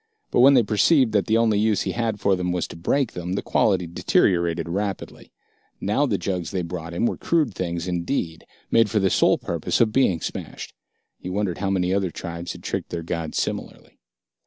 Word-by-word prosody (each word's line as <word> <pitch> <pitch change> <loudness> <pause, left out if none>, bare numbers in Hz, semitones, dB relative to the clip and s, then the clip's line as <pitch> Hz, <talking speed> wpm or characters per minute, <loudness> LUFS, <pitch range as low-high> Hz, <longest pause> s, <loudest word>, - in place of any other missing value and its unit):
But - - +2
when 135 +3 +7
they 125 - +5
perceived 115 +4 +3
that 105 -2 +1
the 110 0 +3
only 110 -3 +2
use 110 -1 +2
he - - -2
had 115 -3 -2
for 100 -1 +2
them 90 -1 -2
was 90 -2 -1
to - - -9
break 120 +10 0
them, 90 +1 -5
the 95 - -2
quality 95 -4 +2
deteriorated 85 0 +1
rapidly. 100 +2 -4 0.5
Now 105 +9 +1
the 105 -6 0
jugs 90 -2 -3
they 90 -1 -2
brought 85 -1 -6
him 100 - +1
were - - -1
crude 155 -10 +1
things 85 -2 -3
indeed, 85 -1 -3 0.2
made 115 -2 +4
for 105 - 0
the 95 -3 +2
sole - - +4
purpose - - -2
of 110 -2 +3
being 95 -11 +3
smashed. - - -6 0.5
He 90 - -7
wondered 95 -2 -2
how 100 - -1
many 95 -1 +1
other 95 -2 0
tribes 85 +1 -6
had - - -13
tricked - - -3
their 85 -1 -4
gods 80 -1 -4
similarly. - - -4
95 Hz, 205 wpm, -23 LUFS, 85-110 Hz, 0.5 s, when